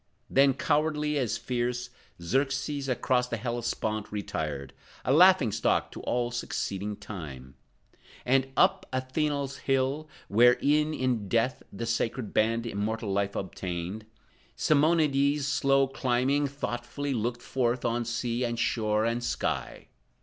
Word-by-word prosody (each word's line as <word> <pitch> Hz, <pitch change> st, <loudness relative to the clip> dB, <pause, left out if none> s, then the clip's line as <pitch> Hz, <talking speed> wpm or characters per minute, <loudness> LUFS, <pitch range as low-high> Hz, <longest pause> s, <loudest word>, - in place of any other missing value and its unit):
Then 135 Hz, 0 st, +5 dB
cowardly 150 Hz, +1 st, +1 dB
as 115 Hz, -4 st, 0 dB
fierce, 120 Hz, +1 st, -2 dB, 0.3 s
Xerxes 135 Hz, -, -1 dB
across 125 Hz, 0 st, +1 dB
the 120 Hz, -, -3 dB
Hellespont 110 Hz, -2 st, -3 dB
retired, 75 Hz, -9 st, -4 dB, 0.3 s
A 130 Hz, -, +3 dB
laughing 175 Hz, -, +6 dB
stock -, -, +1 dB
to -, -, -8 dB
all 120 Hz, 0 st, -1 dB
succeeding 105 Hz, -4 st, -3 dB
time; 70 Hz, -12 st, -8 dB, 0.7 s
And 135 Hz, +1 st, +3 dB
up 190 Hz, 0 st, +3 dB
Anthela's 140 Hz, +1 st, -1 dB
hill, 135 Hz, +3 st, 0 dB, 0.2 s
where, 120 Hz, +4 st, +5 dB
e'en 150 Hz, +2 st, +3 dB
in 125 Hz, -7 st, -1 dB
death 120 Hz, +3 st, +1 dB
The 115 Hz, +4 st, -5 dB
sacred 115 Hz, 0 st, -2 dB
Band 115 Hz, +2 st, +2 dB
immortal 110 Hz, -1 st, -2 dB
life 100 Hz, 0 st, 0 dB
obtained, 95 Hz, +2 st, -4 dB, 0.5 s
Simonides 145 Hz, -2 st, +3 dB
slow 135 Hz, -1 st, +3 dB
climbing, 135 Hz, +2 st, +1 dB
thoughtfully, 140 Hz, +1 st, -4 dB
Looked 120 Hz, +1 st, -2 dB
forth 125 Hz, -1 st, 0 dB
on 120 Hz, 0 st, 0 dB
sea 120 Hz, +1 st, -2 dB
and 120 Hz, -1 st, -1 dB
shore 110 Hz, -2 st, +1 dB
and 115 Hz, +1 st, -1 dB
sky. -, -, -3 dB
125 Hz, 125 wpm, -28 LUFS, 110-140 Hz, 0.7 s, laughing